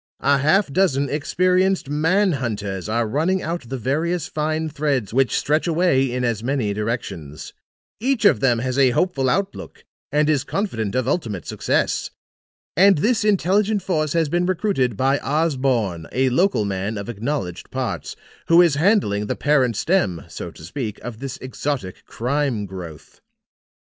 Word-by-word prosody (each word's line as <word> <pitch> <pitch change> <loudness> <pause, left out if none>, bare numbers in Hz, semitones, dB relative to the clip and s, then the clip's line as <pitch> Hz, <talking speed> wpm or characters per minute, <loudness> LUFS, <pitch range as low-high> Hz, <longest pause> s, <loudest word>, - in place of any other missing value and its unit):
A 140 0 +4
half 155 +2 +2
dozen 140 -7 +2
experienced 185 +4 +1
man 165 +7 +2
hunters 105 - -3
are 115 +1 0
running 165 - 0
out 165 -7 -4
the 135 - -3
various 155 +8 -1
fine 155 +1 -2
threads 140 -8 -1
which 135 0 +2
stretch 155 +4 +1
away 160 -6 +2
in 125 0 -2
as 115 -3 -1
many 125 -5 0
directions. 100 - -5 0.5
Each 250 -1 0
of - - +5
them 125 -3 +3
has 130 +3 -1
a 135 -2 +6
hopeful 140 -8 +1
outlook 195 +7 -3 0.3
and 150 +1 +2
is 150 -3 +2
confident 125 - -2
of 130 -1 0
ultimate 110 - -2
success. - - -1 0.7
And 195 0 +6
this 220 +7 +1
intelligent 205 0 +2
force 155 -6 0
has 165 -2 +2
been 175 +4 0
recruited 170 - 0
by 135 +4 +2
Osborne, 130 - 0
a 130 0 +1
local 175 - +2
man 100 +2 -3
of 100 - -5
acknowledged 115 - -4
parts, - - -4 0.3
who 165 +1 +6
is 175 -4 +5
handling 160 - +2
the - - -1
parent 135 -6 +2
stem, 100 - 0
so - - -7
to - - -14
speak, 105 - -5
of 115 -1 -7
this 135 -1 -5
exotic 130 -6 -4
crime 125 -3 -1
growth. 90 -5 -10
140 Hz, 155 wpm, -22 LUFS, 115-170 Hz, 0.7 s, a